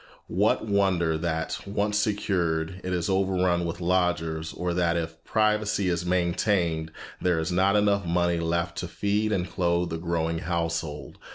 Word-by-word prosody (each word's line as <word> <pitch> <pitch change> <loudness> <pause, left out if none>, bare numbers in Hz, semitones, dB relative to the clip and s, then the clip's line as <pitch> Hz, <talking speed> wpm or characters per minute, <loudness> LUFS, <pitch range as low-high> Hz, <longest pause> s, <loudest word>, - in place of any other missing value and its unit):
What - - +2
wonder 95 -6 +2
that, 80 0 -2
once 105 +1 0
secured, 95 -5 0
it 95 - -3
is 90 -2 0
overrun 95 -2 +1
with 85 +1 -4
lodgers, 85 -3 0
or 90 -1 -2
that, 85 -1 +1
if 80 0 -5
privacy 105 -3 +1
is 90 0 -1
maintained, 85 -2 +1 0.3
there 90 -2 +2
is 80 +2 -1
not 95 +3 +3
enough 100 -1 +3
money 85 0 +1
left 85 +1 -1
to 90 - -3
feed 105 +4 0
and 90 -3 0
clothe 85 -2 0
the 80 - -3
growing 85 -1 -1
household. 80 -4 -3
90 Hz, 155 wpm, -26 LUFS, 85-95 Hz, 0.3 s, not